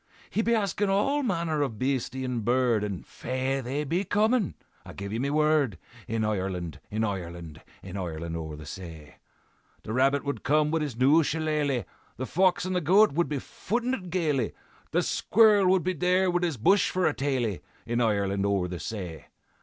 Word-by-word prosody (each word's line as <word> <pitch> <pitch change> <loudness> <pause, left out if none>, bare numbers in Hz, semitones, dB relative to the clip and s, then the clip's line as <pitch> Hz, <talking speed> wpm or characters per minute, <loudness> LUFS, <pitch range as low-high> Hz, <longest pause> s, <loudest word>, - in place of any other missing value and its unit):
"'He 220 - +1
be 235 +1 +2
askin' 205 -1 0
all 275 +10 +2
manner 165 - 0
of 125 -7 -2
beastie 130 +1 -1
and 125 -3 -2
bird, 120 -2 +2
And 100 -4 -4
faix! 130 +1 -2
they 135 +5 -2
be 170 +6 0
comin', 215 +2 +1 0.3
I - - -10
give 100 +1 -6
ye 115 - -1
me 140 +3 0
word; 150 - +2 0.3
In 115 0 -1
Ireland, 95 -5 -3
in 110 +2 -1
Ireland, 85 -6 -5 0.2
In 95 0 -8
Ireland 85 -3 -4
o'er 80 -2 -5
the 75 0 -10
say, 80 -2 -9 0.7
The 110 - -5
rabbit 135 +3 +2
would 140 - -3
come 150 +1 +2
wid 165 0 +1
his 140 -6 -3
new 140 +6 +5
shillelagh, 150 -4 0 0.3
The 130 - -3
fox 185 +4 +2
and 185 0 -2
the 180 - +1
goat 195 +7 +5
would 170 +4 0
be 150 - -1
footin' 240 - -2
it 185 -8 -4
gaily, 155 -9 0 0.4
The - - +1
squirrel 205 -4 +4
be 185 +1 -1
there 180 +3 +2
wid 175 0 +1
his 165 -6 -1
bush 195 - +4
for 185 -1 0
a 155 - +3
taily, 130 -9 -1 0.2
In 120 +1 0
Ireland 100 -3 +1
o'er 100 -3 +1
the 90 -1 -6
say. 90 -7 -6
135 Hz, 185 wpm, -27 LUFS, -, 0.7 s, new